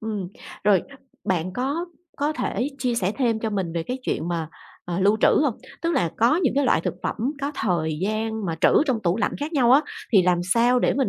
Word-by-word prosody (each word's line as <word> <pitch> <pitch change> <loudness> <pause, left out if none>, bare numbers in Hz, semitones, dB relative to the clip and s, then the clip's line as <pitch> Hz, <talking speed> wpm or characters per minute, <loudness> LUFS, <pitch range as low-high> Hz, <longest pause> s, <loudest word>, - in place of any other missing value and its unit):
Ừm, 210 -4 -4 0.4
rồi 200 -4 +4 0.4
bạn 185 -1 -1
có 280 - -2 0.3
có 295 +2 0
thể 250 -4 -2
chia 250 -3 0
sẻ 195 -3 0
thêm 235 -4 +1
cho 220 - -2
mình 190 -5 -2
về 165 - -1
cái 250 +8 -4
chuyện 165 -8 -2
mà, 165 -3 -2 0.4
ờ, 175 +1 -3
lưu 205 +3 +4
trữ - - +6 0.2
hông? 280 -7 +1 0.3
Tức 335 - +1
là 215 - +1
có 235 +8 +4
những 310 -10 +1
cái 285 - +3
loại - - +3
thực - - -3
phẩm - - -2 0.2
có 280 +1 -2
thời 165 - -1
gian 220 +1 -2
mà 165 - -1
trữ - - +6 0.2
trong 250 -4 +1
tủ 175 0 +1
lạnh - - 0
khác 295 +3 -3
nhau 255 -5 +4
á, 275 - +7 0.3
thì 195 -3 +6
làm 180 -1 +2
sao 235 +7 +3
để - - +2
mình 270 -2 +1
220 Hz, 235 wpm, -24 LUFS, 185-260 Hz, 0.4 s, á